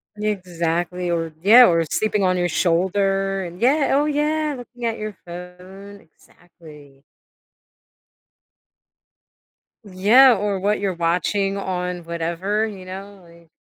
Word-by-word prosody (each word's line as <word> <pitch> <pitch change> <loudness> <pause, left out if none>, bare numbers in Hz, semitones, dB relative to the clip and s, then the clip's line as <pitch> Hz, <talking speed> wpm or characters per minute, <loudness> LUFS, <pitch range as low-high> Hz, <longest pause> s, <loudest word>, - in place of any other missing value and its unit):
Exactly, 180 -4 -3
or 165 -2 -2
Yeah, 230 +7 +8
or 165 -1 +2
sleeping 210 -2 0
on 185 0 +1
your 175 - 0
shoulder, 195 +3 0
and 175 +2 -10
Yeah, 275 +5 +2
oh 290 - +2
yeah, 300 0 -1
looking 245 -1 -9
at 230 -1 -2
your 215 -3 -6
phone, 180 +3 -11
exactly. 155 -4 -19 2.8
Yeah, 210 +8 +5
or 200 -1 -2
what 205 +2 0
you're 195 -2 -1
watching 180 +4 -1
on 180 -2 -4
whatever, 170 +6 -2
you 195 -4 -8
know, 195 +2 -9
like 170 0 -20
190 Hz, 120 wpm, -21 LUFS, 175-210 Hz, 2.8 s, Yeah